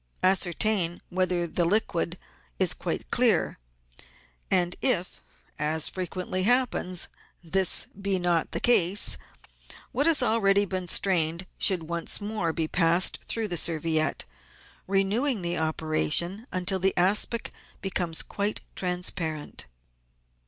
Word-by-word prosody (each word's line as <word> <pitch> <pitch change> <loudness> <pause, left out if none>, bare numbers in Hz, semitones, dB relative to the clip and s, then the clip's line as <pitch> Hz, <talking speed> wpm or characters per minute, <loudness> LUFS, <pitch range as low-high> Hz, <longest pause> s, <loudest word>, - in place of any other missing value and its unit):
Ascertain 185 -1 +1
whether 180 -1 -1
the 170 +1 -1
liquid 175 -2 -1 0.4
is - - +3
quite - - -6
clear, - - +2 0.9
and 180 -1 +2
if, 185 -9 +3 0.4
as 155 +1 +3
frequently 185 0 -4
happens, 225 -5 +2 0.4
this 185 +2 +4
be 195 -1 -3
not 175 -3 0
the - - 0
case, 200 -4 +3 0.7
what 285 +4 0
has 315 -6 +5
already 205 -3 +2
been 185 -1 -4
strained 170 -2 +2
should 185 -5 +2
once 170 +1 -2
more 205 -5 -3
be 160 -1 -3
passed 170 +1 +2
through 225 -2 -2
the 175 -3 -2
serviette, 160 -1 +1 0.6
renewing 200 +4 0
the 170 0 0
operation 160 - -1
until 185 +1 0
the 190 +1 0
aspic 205 +5 +1 0.3
becomes 180 -4 -2
quite 205 +1 -3
transparent. 175 - -3
180 Hz, 115 wpm, -26 LUFS, 170-200 Hz, 0.9 s, has